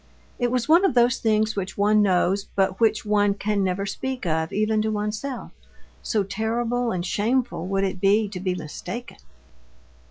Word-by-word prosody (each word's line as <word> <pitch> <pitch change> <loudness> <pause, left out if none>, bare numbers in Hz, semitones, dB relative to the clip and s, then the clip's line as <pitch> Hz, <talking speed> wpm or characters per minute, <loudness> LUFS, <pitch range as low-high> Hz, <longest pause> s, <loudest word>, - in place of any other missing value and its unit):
It 245 -1 +1
was 250 0 -1
one 335 +4 +5
of 385 - +2
those 245 +1 +3
things 215 -1 +1
which 190 -1 -4
one 210 +1 +4
knows 195 0 +2
but 190 -1 +1
which 220 -2 +2
one 205 -1 +2
can 205 0 -1
never 190 +1 -1
speak 260 +3 -4
of 160 -1 -1
even 215 +1 +1
to 220 - 0
oneself, 215 +5 -4 0.5
so 215 -3 0
terrible 230 +4 -1
and 180 -1 -2
shameful 220 -2 -1
would 195 0 0
it 190 -1 -2
be 205 +2 +3
to 190 -2 -6
be 185 -1 -1
mistaken. 235 +9 -7
210 Hz, 170 wpm, -24 LUFS, 195-235 Hz, 0.5 s, one